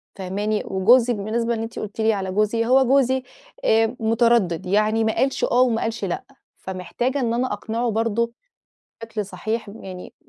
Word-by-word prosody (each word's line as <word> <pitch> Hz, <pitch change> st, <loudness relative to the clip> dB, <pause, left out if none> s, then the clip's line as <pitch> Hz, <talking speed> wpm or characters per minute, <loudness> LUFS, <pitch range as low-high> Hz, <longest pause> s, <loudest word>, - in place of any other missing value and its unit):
فاهماني؟ 205 Hz, +3 st, -2 dB
وجوزي، 235 Hz, +6 st, +4 dB
بالنسبة 230 Hz, +3 st, -1 dB
إن 225 Hz, -, -3 dB
أنتِ 225 Hz, -, -6 dB
قُلتِ 215 Hz, +1 st, -5 dB
لي 220 Hz, 0 st, +3 dB
على 190 Hz, -2 st, -3 dB
جوزي، 215 Hz, +3 st, +1 dB
هو 265 Hz, +2 st, +5 dB
جوزي 260 Hz, -1 st, +3 dB, 0.4 s
آآ، 225 Hz, +2 st, +3 dB
متردد، 225 Hz, -6 st, +2 dB
يعني 215 Hz, +3 st, +2 dB
ما 220 Hz, -, 0 dB
قالش 265 Hz, +3 st, 0 dB
آه 245 Hz, -, +3 dB
وما 235 Hz, -3 st, +2 dB
قالش 225 Hz, -2 st, -2 dB
لأ. 175 Hz, -, -3 dB, 0.3 s
فمحتاجة 190 Hz, +9 st, -3 dB
إن 235 Hz, -2 st, 0 dB
أنا 245 Hz, -2 st, 0 dB
أقنعه 230 Hz, +3 st, -2 dB
برضه 230 Hz, +1 st, 0 dB, 0.7 s
بشكل 220 Hz, -3 st, -4 dB
صحيح، 220 Hz, +2 st, -4 dB
يعني 185 Hz, -1 st, -9 dB
225 Hz, 165 wpm, -22 LUFS, 205-235 Hz, 0.7 s, هو